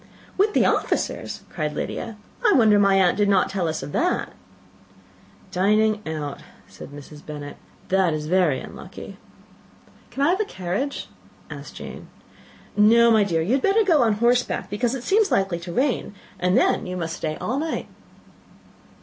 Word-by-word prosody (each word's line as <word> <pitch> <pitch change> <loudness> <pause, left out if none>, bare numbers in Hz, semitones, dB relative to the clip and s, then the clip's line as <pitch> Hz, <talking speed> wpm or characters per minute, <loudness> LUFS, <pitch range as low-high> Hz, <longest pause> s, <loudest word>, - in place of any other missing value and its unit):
"With 415 +2 +2
the - - +4
officers!" - - -1
cried 150 -3 -3
Lydia: 225 +6 -4 0.3
"I - - +5
wonder 215 -4 +5
my 200 -1 +4
aunt 185 -2 +4
did 205 -1 +2
not 195 -1 +3
tell 190 -4 -1
us 160 0 -3
of - - -7
that." 360 - 0 1.2
"Dining 210 +3 +2
out," 150 -3 -4 0.3
said - - -11
Mrs. 145 +1 -12
Bennet; 145 -1 -8 0.3
"that 190 -2 +3
is 155 -1 -3
very 165 -5 +2
unlucky." - - -10 0.9
"Can 275 - -2
I 285 - +4
have 370 +3 +1
the 430 - +1
carriage?" 190 - -4 0.4
said - - -9
Jane. - - -9 0.7
"No, 230 +3 +6
my 220 -2 +5
dear, 165 -5 0
you 185 - -2
had 270 - +2
better 405 +6 +3
go 335 -8 +4
on 225 -3 +3
horseback, 240 -1 +1
because 235 +4 0
it 250 - -6
seems 410 +5 +3
likely 190 -3 +1
to 175 0 -7
rain; 250 -2 -1 0.2
and 180 +1 +2
then - - +2
you 180 0 -4
must 165 -2 -3
stay 155 -1 -3
all 255 +5 -2
night." 320 +1 -3
200 Hz, 165 wpm, -23 LUFS, 170-245 Hz, 1.2 s, No